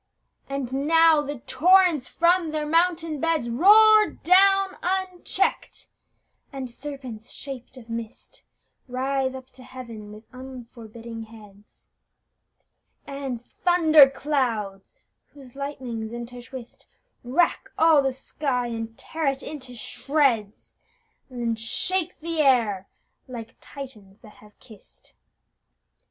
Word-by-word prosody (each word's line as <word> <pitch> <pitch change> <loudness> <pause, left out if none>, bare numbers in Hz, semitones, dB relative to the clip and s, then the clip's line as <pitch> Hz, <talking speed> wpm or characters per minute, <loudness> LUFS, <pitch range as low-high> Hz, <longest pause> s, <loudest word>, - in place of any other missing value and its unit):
And 275 0 -3
now 325 -1 +5
the 290 -3 -6
torrents 355 -3 +4
from 340 0 +2
their 305 -1 -2
mountain 330 -1 +1
beds 320 -8 0
Roar 425 - +6
down 390 +2 +4
uncheck'd; 375 0 -2 0.7
and 265 -3 -6
serpents 255 -4 -8
shaped 265 -2 -9
of 235 -3 -13
mist 230 -1 -8 0.5
Writhe 265 +1 -1
up 260 0 -11
to 255 - -15
Heaven 235 -5 -10
with 215 +1 -12
unforbidden 235 -3 -10
heads; 210 -2 -18 1.1
And 270 -4 -6
thunder 320 -5 +5
clouds, 240 - -2 0.4
whose 270 -3 -14
lightnings 255 -6 -5
intertwist, 240 +1 -9 0.4
Rack 300 +8 +1
all 320 -3 +5
the 270 -1 0
sky, 260 -1 -3
and 225 -1 -6
tear 320 -2 -4
it 270 0 -1
into 260 -5 -8
shreds, 240 -5 -1 0.5
And 235 -3 -3
shake 360 +10 0
the 330 0 -3
air 225 -9 +2 0.4
like 230 -3 -9
Titians 220 -8 -11
that 215 - -16
have 210 0 -19
kiss'd! 215 -3 -18
265 Hz, 110 wpm, -24 LUFS, 235-315 Hz, 1.1 s, Roar